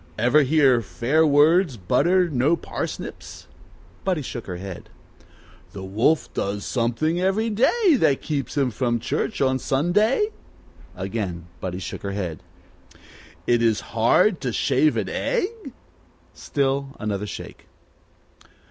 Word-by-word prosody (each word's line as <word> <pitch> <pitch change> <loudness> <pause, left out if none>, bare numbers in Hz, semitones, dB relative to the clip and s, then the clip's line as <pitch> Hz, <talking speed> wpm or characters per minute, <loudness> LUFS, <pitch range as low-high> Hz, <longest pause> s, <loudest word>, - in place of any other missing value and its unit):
Ever 125 +7 +4
hear, 135 -4 +4
Fair 145 +9 +1
words 150 0 +4
butter 165 - +2
no 145 +2 +2
parsnips?" - - -6 0.6
Buddie 180 -6 0
shook 120 -2 -7
her 90 - -4
head. 95 -1 -8 0.8
"The 95 - -7
wolf 110 +12 +1
does 100 +1 -3
something 135 +8 0
every 210 +4 +1
day 330 - +3
that 140 - +2
keeps 145 -2 -4
him 135 -3 +2
from 120 +1 0
church 145 - -2
on 130 -1 +2
Sunday 210 - +1 0.3
?" - - -25
Again 95 -5 -4
Buddy 90 -1 -4
shook 95 - -6
her 100 -1 -4
head. 90 -6 -4 1.0
"It 120 -1 +2
is 115 -2 +2
hard 130 - +3
to 125 - -2
shave 140 +6 +2
an - - -1
egg 455 -2 -2 0.3
?" - - -33 0.3
Still 140 0 -2
another 105 -1 -3
shake. - - -9
135 Hz, 130 wpm, -23 LUFS, 110-165 Hz, 1.0 s, Ever